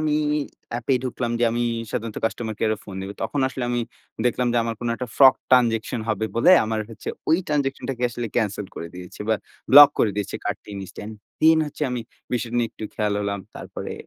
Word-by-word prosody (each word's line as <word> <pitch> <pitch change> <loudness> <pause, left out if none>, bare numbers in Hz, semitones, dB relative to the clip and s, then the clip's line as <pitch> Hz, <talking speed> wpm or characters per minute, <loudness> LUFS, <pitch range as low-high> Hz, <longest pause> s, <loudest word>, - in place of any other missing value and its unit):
আমি 150 -1 +1 0.6
এ্যাপে 120 +3 0
ঢুকলাম 120 -1 -2
যে 120 - +3
আমি 120 - 0 0.3
সাধারণত 115 -2 -4
কাস্টমার 110 0 -2
কেয়ারে 110 -1 +1
ফোন 100 - -9
দিবো। 95 +1 -5
তখন 145 - -1
আসলে 130 -2 -4
আমি 120 - 0 0.5
দেখলাম 125 0 +1
যে - - +1
আমার 115 -1 -2
কোন 120 - -2
একটা 125 - -5
ফ্রড 135 -2 +8 0.2
ট্রান্সেকশন 120 -2 +3
হবে 110 0 0
বলে 115 - +5
আমার 110 0 -1
হচ্ছে 115 +1 -8 0.2
ওই 165 - +5
ট্রান্সেকশনটাকে 135 -4 -2
আসলে 120 0 -4
ক্যানসেল 105 -3 0
করে 85 - -6
দিয়েছে, 90 +2 -10
বা 110 - +4 0.4
ব্লক 145 +1 +12
করে 105 - +3
দিয়েছে 105 - -3
কার্ডটি - - -4
ইন্স্ট্যান্ট। 105 +3 -8 0.3
দেন 160 +1 +6
হচ্ছে 150 - -7
আমি 125 -1 -2 0.3
বিষয়টা 120 0 -1
নিয়ে 120 -1 +1
একটু 110 - -8
খেয়াল 105 -1 0
হলাম। 100 -1 -2 0.2
তারপরে - - -6
120 Hz, 190 wpm, -23 LUFS, 110-130 Hz, 0.6 s, ব্লক